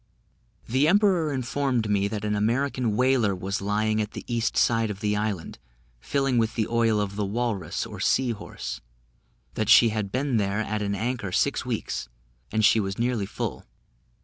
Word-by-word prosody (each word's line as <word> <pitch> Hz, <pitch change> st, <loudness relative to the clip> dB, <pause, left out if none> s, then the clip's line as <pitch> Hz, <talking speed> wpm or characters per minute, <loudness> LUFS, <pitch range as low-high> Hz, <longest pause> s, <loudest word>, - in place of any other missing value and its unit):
The 130 Hz, +5 st, +2 dB
emperor 185 Hz, -4 st, +3 dB
informed 130 Hz, -3 st, -1 dB
me 100 Hz, -1 st, +1 dB
that 105 Hz, 0 st, -4 dB
an 105 Hz, 0 st, 0 dB
American 120 Hz, +1 st, 0 dB
whaler 125 Hz, -5 st, +2 dB
was 95 Hz, +3 st, -3 dB
lying 110 Hz, +2 st, +1 dB
at 105 Hz, 0 st, -4 dB
the -, -, -7 dB
east 115 Hz, -2 st, -1 dB
side 115 Hz, -1 st, +3 dB
of 100 Hz, -2 st, -5 dB
the 105 Hz, -1 st, 0 dB
island, 105 Hz, -5 st, -3 dB, 0.4 s
filling 135 Hz, -, 0 dB
with 115 Hz, 0 st, 0 dB
the 110 Hz, -3 st, 0 dB
oil 115 Hz, -2 st, +2 dB
of 100 Hz, -1 st, -2 dB
the 105 Hz, -, -1 dB
walrus, 100 Hz, -5 st, -2 dB
or 105 Hz, -3 st, -9 dB
sea 125 Hz, +5 st, +2 dB
horse; 105 Hz, -, -6 dB, 0.7 s
that 110 Hz, -2 st, -2 dB
she 115 Hz, -, +8 dB
had 105 Hz, -2 st, -3 dB
been 130 Hz, -1 st, 0 dB
there 100 Hz, 0 st, 0 dB
at 110 Hz, 0 st, -2 dB
an 100 Hz, -1 st, -1 dB
anchor 115 Hz, -2 st, -2 dB
six -, -, 0 dB
weeks, -, -, -3 dB, 0.4 s
and 110 Hz, 0 st, +2 dB, 0.2 s
was 95 Hz, 0 st, -4 dB
nearly 120 Hz, -4 st, 0 dB
full. -, -, -5 dB
110 Hz, 175 wpm, -26 LUFS, 105-125 Hz, 0.7 s, she